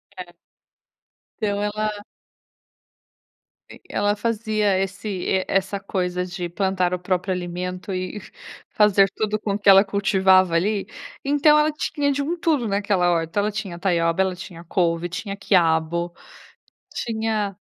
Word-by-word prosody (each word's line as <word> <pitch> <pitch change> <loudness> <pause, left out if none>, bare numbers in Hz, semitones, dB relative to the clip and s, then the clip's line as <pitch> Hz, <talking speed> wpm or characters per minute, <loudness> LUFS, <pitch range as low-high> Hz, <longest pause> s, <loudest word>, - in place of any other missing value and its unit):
É. 175 -2 -10 1.1
Então, 205 -1 0
ela 215 +1 -1 1.8
E - - -13
ela 205 0 +1
fazia 215 -2 0
esse 195 -1 -2
essa 195 +1 0
coisa 180 -2 -2
de 175 -1 -5
plantar 185 0 0
o 180 - -1
próprio 185 +1 -1
alimento 180 +1 -5
e 185 +3 -4
fa - - -15 0.6
fazer 195 -1 +4
tudo 215 -1 -1
com 205 -1 -2
o 205 - -2
que 205 - -5
ela 195 +1 +8
cultivava 190 -2 +3
ali, 200 +4 +1 0.4
então 290 +2 +4
ela 305 +1 +2
tinha 290 -1 -1
de 280 +1 -1
um 335 +5 -2
tudo 310 -7 +1
naquela 200 -3 +1
horta. 165 +3 0
Ela 210 +1 0
tinha 200 -5 -5
taioba, 170 -1 +1
ela 190 -1 0
tinha 175 -2 -10
couve, 170 0 0
tinha 195 +3 -5
quiabo, 170 -3 +1 0.8
tinha 220 -3 -2
195 Hz, 140 wpm, -23 LUFS, 180-210 Hz, 1.8 s, ela